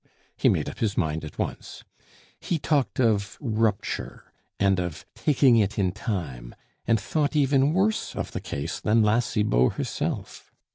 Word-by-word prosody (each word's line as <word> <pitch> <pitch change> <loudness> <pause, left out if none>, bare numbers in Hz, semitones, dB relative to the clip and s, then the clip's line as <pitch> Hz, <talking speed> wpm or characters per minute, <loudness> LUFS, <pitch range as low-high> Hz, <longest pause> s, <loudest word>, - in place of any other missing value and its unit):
He - - +3
made - - +1
up - - -7
his 110 -3 -1
mind 80 -2 0
at 75 - -9
once. - - -5 0.6
He 170 - -1
talked 145 -4 0
of 105 -5 +1
rupture, 110 -5 -2 0.3
and 100 -2 +3
of 90 -4 -4
taking 135 -4 +4
it 105 -1 +1
in 95 -3 +2
time, 80 - -5 0.3
and 115 -1 +3
thought 145 +11 -1
even 140 -1 +3
worse 195 +5 0
of - - -4
the - - -4
case 70 +4 -4
than 110 +1 +3
La 105 +2 +3
Cibot 105 - +2
herself. - - -4
110 Hz, 155 wpm, -26 LUFS, 95-130 Hz, 0.6 s, taking